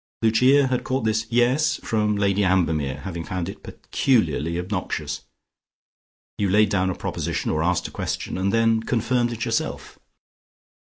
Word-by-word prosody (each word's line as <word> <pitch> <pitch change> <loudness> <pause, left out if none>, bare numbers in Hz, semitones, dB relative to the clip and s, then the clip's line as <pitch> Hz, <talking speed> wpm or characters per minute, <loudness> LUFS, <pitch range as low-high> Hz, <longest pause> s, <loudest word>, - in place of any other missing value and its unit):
Lucia 130 +5 +5
had 130 -1 -1
caught 130 -1 -1
this 110 0 0
"Yes" 125 +6 +2
from 105 -1 0
Lady 100 0 +1
Ambermere, 80 -7 +1
having 85 -3 -5
found 90 -2 -4
it - - -8
peculiarly 85 - 0
obnoxious. 85 -5 -4 1.1
You 100 -2 +1
laid 105 +3 +4
down 95 -1 +1
a 90 - -2
proposition, - - -3
or 80 - 0
asked 90 +1 0
a - - -11
question, - - -4
and 95 +2 0
then 115 0 +3
confirmed 120 +1 0
it 115 0 -3
yourself. 115 -2 -3
105 Hz, 150 wpm, -23 LUFS, 90-115 Hz, 1.1 s, Lucia